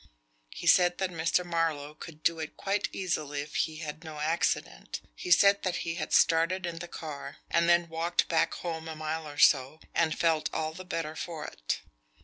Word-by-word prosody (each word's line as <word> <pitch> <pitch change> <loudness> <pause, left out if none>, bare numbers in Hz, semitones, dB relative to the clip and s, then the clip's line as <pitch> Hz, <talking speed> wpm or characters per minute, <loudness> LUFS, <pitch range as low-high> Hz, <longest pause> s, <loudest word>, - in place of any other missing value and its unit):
He - - -8
said 175 -1 +5
that 190 -1 -1
Mr. 165 +2 +1
Marlowe 165 -4 -1
could 155 0 -11
do 165 -1 +2
it 155 -1 -6
quite 200 +1 0
easily 150 -6 -2
if 150 +1 -9
he 160 - 0
had 155 0 -6
no 160 -2 -8
accident. 160 +3 -1
He 180 - -7
said 200 +3 +6
that 185 -2 -1
he 165 - -1
had 165 - -4
started 170 +3 +3
in 170 -1 -4
the 175 - -6
car, 155 -4 -7
and 170 0 +3
then 170 0 +4
walked 165 +1 0
back 160 -1 +2
home 160 -2 -4
a 160 - -5
mile 155 0 -3
or 145 0 -9
so, 140 +1 +4
and 160 -2 +1
felt 165 -2 +2
all 155 0 -2
the 185 +3 -9
better 160 -3 -3
for 160 -2 -5
it." - - -3
165 Hz, 195 wpm, -29 LUFS, 155-170 Hz, -, said